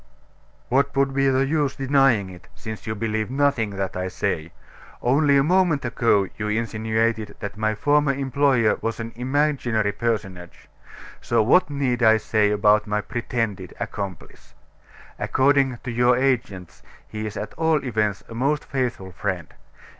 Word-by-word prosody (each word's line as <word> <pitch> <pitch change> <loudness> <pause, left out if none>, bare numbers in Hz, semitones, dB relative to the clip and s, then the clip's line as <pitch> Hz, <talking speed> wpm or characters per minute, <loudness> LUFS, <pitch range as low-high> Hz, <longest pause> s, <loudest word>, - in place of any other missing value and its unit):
"What 140 +3 +1
would 135 0 +2
be 135 0 +2
the 135 +1 +2
use 145 -1 0
denying 135 -8 +2
it, 90 +3 -14
since 110 -1 -8
you 110 - -2
believe 110 0 -2
nothing 135 -5 +1
that 95 -1 -3
I 90 0 -2
say? 85 -4 -3 0.5
Only 140 +3 +3
a 135 - +4
moment 170 -4 +2
ago 115 -4 +2
you 105 - -2
insinuated 110 0 -1
that 100 0 -6
my 110 0 -1
former 145 +4 +2
employer 135 -4 +1
was 115 +1 -3
an 115 0 -5
imaginary 125 -4 0
personage; 100 -6 -4 0.5
so 115 -2 +2
what 145 +9 +4
need 135 -4 -1
I 110 -1 +6
say 110 -1 +1
about 105 +1 +3
my 105 0 0
pretended 115 -1 -3
accomplice? 95 -5 -7 0.6
According 135 -1 +2
to 125 - -4
your 120 +1 +3
agents, 120 -9 -2 0.3
he's 110 0 -6
at 105 - -5
all 160 -3 +1
events 105 -4 -1
a - - -10
most 140 +6 0
faithful 120 -8 -3
friend. 90 -3 -4
115 Hz, 145 wpm, -23 LUFS, 105-135 Hz, 0.6 s, I